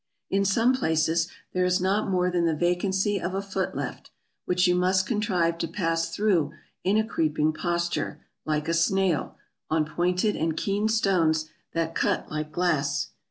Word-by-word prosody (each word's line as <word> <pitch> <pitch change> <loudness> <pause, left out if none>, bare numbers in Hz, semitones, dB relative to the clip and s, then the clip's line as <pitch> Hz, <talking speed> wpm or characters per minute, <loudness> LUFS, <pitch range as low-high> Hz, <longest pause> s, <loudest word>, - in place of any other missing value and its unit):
In 195 0 +2
some 225 +6 +3
places 160 -6 +1 0.3
there 180 - +1
is 180 0 +2
not 195 +3 +1
more 180 -1 +1
than 175 -1 +1
the 165 -1 +1
vacancy 190 +4 +1
of 185 +2 -3
a 195 - 0
foot 195 -1 -3
left, - - -5 0.4
which 180 +1 +2
you 180 - +4
must 185 +1 +2
contrive 185 -7 0
to - - -1
pass 165 -1 -1
through 175 -8 +1 0.3
in 195 +3 +2
a 220 - +2
creeping 155 -6 0
posture, 175 +1 -2 0.2
like 155 0 -1
a 165 - +1
snail, 175 0 +1 0.3
on 155 -1 +2
pointed 180 +6 0
and 160 0 -1
keen 205 +2 0
stones 165 -8 +2 0.2
that 165 0 -1
cut - - 0
like 155 0 -3
glass. 155 -4 0
180 Hz, 165 wpm, -26 LUFS, 160-195 Hz, 0.4 s, you